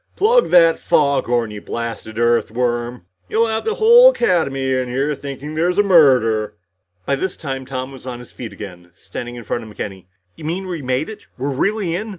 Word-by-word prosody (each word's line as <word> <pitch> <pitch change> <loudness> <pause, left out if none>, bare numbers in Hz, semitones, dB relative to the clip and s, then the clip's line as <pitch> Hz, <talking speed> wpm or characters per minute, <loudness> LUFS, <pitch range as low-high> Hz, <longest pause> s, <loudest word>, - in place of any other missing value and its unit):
"Plug 470 +4 +3
that 165 -2 +5
foghorn, 120 -6 +1
you 105 -1 -8
blasted 115 -1 -6
Earthworm. 120 0 0 0.2
You'll 225 +1 +2
have 220 -1 -2
the 440 - 0
whole 475 +3 +8
Academy 140 - 0
in 130 -1 -1
here 135 +4 0
thinking 140 +1 -7
there's 170 +3 0
a 205 - +5
murder." 125 - +4 0.5
By 140 - +1
this 185 +6 -3
time 135 -4 -5
Tom 130 0 -5
was 130 -1 -12
on 125 -1 -5
his 120 0 -13
feet 115 -3 -8
again, 90 -4 -10
standing 120 +4 -8
in 120 - -8
front 120 +2 -3
of 110 - -11
McKenny. 95 -3 -7 0.3
"You 155 - -10
mean, 180 +5 -3
we 175 -4 -5
made 130 +3 -1
it? 220 - -10
We're 135 +3 -2
really 195 +4 -1
in? 215 +5 -4
135 Hz, 190 wpm, -19 LUFS, 120-175 Hz, 0.5 s, whole